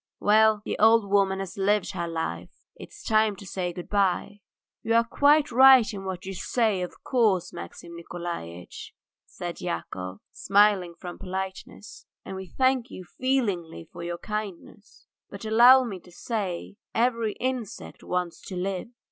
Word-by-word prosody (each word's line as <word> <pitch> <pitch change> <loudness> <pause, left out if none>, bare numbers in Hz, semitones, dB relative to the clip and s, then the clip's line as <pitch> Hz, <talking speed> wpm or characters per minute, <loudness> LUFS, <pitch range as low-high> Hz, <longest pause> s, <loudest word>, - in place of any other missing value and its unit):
"Well, 215 0 +4
the - - -3
old 225 -1 +5
woman 195 -1 +2
has 195 -1 -6
lived 205 0 +1
her 175 -3 -3
life, 90 - -4 0.3
it's - - -12
time 215 -1 +2
to 200 - -12
say 180 -1 -3
good 175 0 -8
bye." 200 0 0 0.4
"You 225 - 0
are 230 - +5
quite 290 +5 +3
right 260 0 +8
in 195 -1 -7
what 185 -1 -5
you 195 - -5
say, 215 0 0
of 180 - -7
course, 215 -8 +1
Maxim 170 - -9
Nikolaitch," 170 - -7 0.3
said - - -7
Yakov, 90 +3 -5
smiling 200 -3 +2
from 175 -1 -8
politeness, 190 +2 -7 0.2
"and 190 - -6
we 190 0 -7
thank 260 +2 +1
you 185 - -9
feelingly 190 - -2
for - - -8
your 170 0 -4
kindness, 210 0 -7 0.2
but 200 +2 -9
allow 240 +4 +7
me 205 -7 -5
to 180 - -18
say 195 -1 -4 0.2
every 230 -2 +1
insect 255 -4 -5
wants 180 -2 -3
to 190 - -6
live." 185 +3 -3
195 Hz, 155 wpm, -26 LUFS, 175-225 Hz, 0.4 s, right